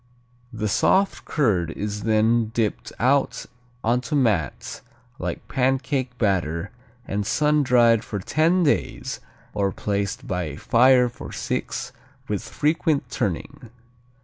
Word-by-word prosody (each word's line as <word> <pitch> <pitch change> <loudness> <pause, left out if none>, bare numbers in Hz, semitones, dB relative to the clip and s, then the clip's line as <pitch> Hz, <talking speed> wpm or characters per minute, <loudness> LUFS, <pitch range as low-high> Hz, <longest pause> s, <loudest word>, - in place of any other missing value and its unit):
The 110 -3 -3
soft 190 - +2
curd 100 - +1
is 105 +4 -4
then 110 +1 +3
dipped 110 -3 -1
out 135 +4 +1 0.4
onto 125 +6 0
mats 105 - 0 0.4
like - - -4
pancake 130 -1 0
batter 90 -4 0 0.4
and 100 +1 -1
sun 150 +7 +2
dried 120 -4 +4
for 105 - -5
ten 160 - +2
days 145 - -1 0.3
or 100 -1 0
placed 100 0 -3
by 90 -2 -1
a 75 -2 -6
fire 125 - +4
for 120 - -9
six, - - -3 0.4
with - - -2
frequent 150 -4 0
turning. 120 - -3
115 Hz, 120 wpm, -23 LUFS, 100-135 Hz, 0.4 s, dried